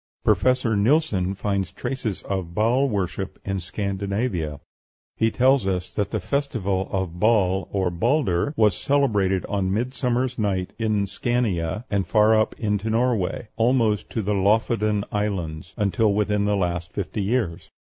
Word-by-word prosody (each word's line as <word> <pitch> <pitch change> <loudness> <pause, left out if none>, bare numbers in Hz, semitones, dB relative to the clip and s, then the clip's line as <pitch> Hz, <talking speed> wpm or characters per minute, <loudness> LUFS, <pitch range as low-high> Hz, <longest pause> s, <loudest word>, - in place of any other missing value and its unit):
Professor 125 -3 +2
Nilsson 100 - +2
finds 100 -2 -2
traces 120 -7 -4
of 95 -4 -4
Baal 125 +6 +2
worship 95 -2 -3
in 95 -1 -1
Scandinavia; 100 - -3 0.6
he 115 - +2
tells 130 -2 +3
us 90 -1 -2
that 100 -2 -1
the 110 - -2
festival 100 -6 -1
of 95 -3 -3
Baal, 95 -3 +2
or 95 -3 0
Balder, 115 - +1
was 105 -4 +4
celebrated 105 -10 +1
on 95 -2 -1
midsummer's 125 +3 -1
night 95 -4 -1
in 110 -3 +1
Scania, 100 -2 -1
and 100 -2 0
far 110 0 +4
up 110 0 +1
into 105 -1 -1
Norway, 115 -3 0
almost 115 -3 +2
to 110 - -2
the 105 +2 0
Loffoden 105 +1 +2
Islands, 90 -6 -3
until 105 +1 +2
within 105 0 +1
the 105 0 +2
last 90 -2 -2
fifty 100 +2 -3
years. 100 -5 -1
105 Hz, 140 wpm, -24 LUFS, 95-115 Hz, 0.6 s, was